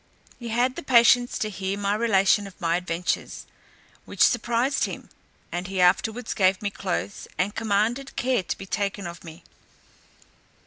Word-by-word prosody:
He 240 - -7
had 245 +3 +1
the - - -4
patience 245 -1 +4
to 215 - -2
hear 190 0 -3
the 200 0 0
relation 205 -2 +3
of 195 - -15
my 170 -2 +1
adventures, 175 0 -3 0.6
which - - +1
surprised 245 +3 +2
him; - - -8 0.4
and 175 +1 -4
he 190 0 -4
afterwards 220 +6 +2
gave 190 -2 +2
me 205 -1 -3
clothes, 195 0 -4
and 195 +3 0
commanded 225 +5 -1
care 255 -3 +1
to 180 - -4
be 195 - -8
taken 200 0 -3
of 170 -1 -8
me. 165 0 -12
200 Hz, 160 wpm, -25 LUFS, 185-235 Hz, 0.6 s, patience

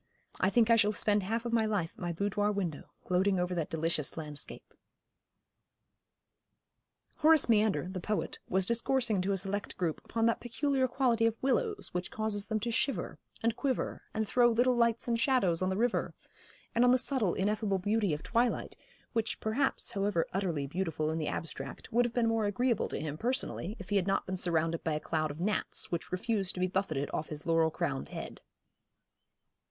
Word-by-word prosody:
'I 190 - +3
think 230 +2 +3
I 230 - +7
shall 210 -1 +3
spend 205 0 +2
half 225 +5 -2
of 235 - -2
my 225 -2 +3
life 195 -6 -1
at - - -15
my 175 -1 -1
boudoir 205 +4 0
window, 185 -7 -3 0.2
gloating 185 +1 +2
over 180 0 0
that 165 -3 -2
delicious 160 -2 +1
landscape.' 150 -2 -7 2.4
Horace 315 -1 +5
Meander, 215 -5 +3
the 185 0 -5
poet, 210 +4 -2
was 190 0 +2
discoursing 235 -2 +1
to 190 +2 0
a 195 - +1
select 200 +2 -3
group 170 -4 -1
upon 225 0 -1
that 230 - +2
peculiar 265 +2 0
quality 240 -3 +2
of 230 0 -1
willows 410 - 0
which 180 +1 -2
causes 215 -1 -1
them 220 -1 0
to 235 - -1
shiver, 265 +4 -1 0.2
and 230 0 +2
quiver, 265 -1 -2
and 220 -1 -2
throw 240 +2 +4
little 245 +2 +3
lights 235 -1 +2
and 235 -1 +1
shadows 235 - +2
on 185 - +1
the 190 - -1
river, 240 +2 0 0.6
and 235 - +3
on 245 - +6
the 255 - +6
subtle, 255 -7 0
ineffable 205 0 0
beauty 205 0 +1
of 150 0 -3
twilight, 235 +1 0 0.4
which 225 0 -1
perhaps, 255 +6 0
however 200 -4 0
utterly 175 -7 -1
beautiful 155 0 -2
in 160 - -2
the 155 - -2
abstract, 165 +7 -6
would 240 +1 +4
have 235 - -3
been 240 -2 +3
more 225 -1 +1
agreeable 235 +2 +1
to - - -4
him 155 0 -4
personally 240 -5 -2
if 190 - -10
he 205 - +2
had 190 -1 0
not 195 - +1
been 185 - -3
surrounded 165 -2 0
by 160 - 0
a 150 - -1
cloud 155 0 -1
of 145 +2 -7
gnats, 210 +4 0
which 170 -2 -3
refused 195 +1 -1
to - - -5
be 180 - +2
buffeted 180 -7 -1
off 155 - -3
his 150 0 -6
laurel 165 -1 +3
crowned 70 - -3
head. - - -7
205 Hz, 190 wpm, -31 LUFS, 175-230 Hz, 2.4 s, I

